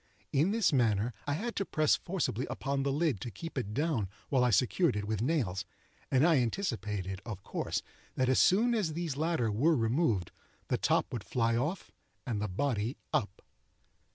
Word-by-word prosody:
In 150 +7 +3
this 215 -5 +2
manner 115 -2 +2
I 145 - +1
had 230 +10 -3
to 200 - +1
press 155 -5 +2
forcibly 165 - -2
upon 140 0 -2
the 140 0 0
lid 145 - 0
to 120 - -4
keep 165 +8 -8
it 120 -7 -2
down 130 - 0 0.2
while 130 -3 +3
I 125 - +4
secured 130 - +3
it 105 -1 -2
with 110 -1 -2
nails; 120 - 0 0.5
and 130 +3 +4
I 165 -3 +5
anticipated, 105 - -2
of 105 -5 -7
course, - - -2 0.3
that 130 - +1
as 130 - +3
soon 230 +6 +4
as 200 -9 0
these 165 -3 -3
latter 155 -7 0
were 150 +11 +3
removed, 115 - +1 0.4
the - - +2
top - - +1
would 115 -5 -3
fly 115 0 +1
off 150 +10 -2 0.3
and 115 -6 -2
the 105 - 0
body 115 +3 -1 0.2
up. 100 -1 -1
130 Hz, 180 wpm, -31 LUFS, 110-160 Hz, 0.5 s, I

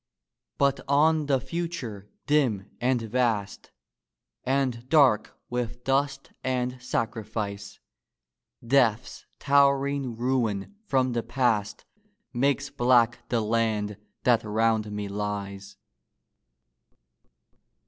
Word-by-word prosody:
But 140 -1 +2
on 150 +2 +3
the 135 -2 +2
future, 130 - -5 0.2
dim 125 -10 +1
and 125 -1 +1
vast, 110 -3 -1 0.7
And 130 -2 -1
dark 130 -9 +4
with 125 0 -4
dust 135 +1 0
and 125 -1 -2
sacrifice, 110 -4 -4 0.9
Death's 120 -2 +1
towering 140 -2 +2
ruin 120 - -1
from 130 -4 +2
the 120 -1 -1
past 115 -4 -1 0.5
Makes 135 +2 0
black 120 -1 +2
the 120 -2 +1
land 105 -2 0 0.3
that 120 -2 +3
round 110 0 +1
me 105 -1 -4
lies. 100 -1 -5
120 Hz, 90 wpm, -26 LUFS, 105-135 Hz, 0.9 s, dark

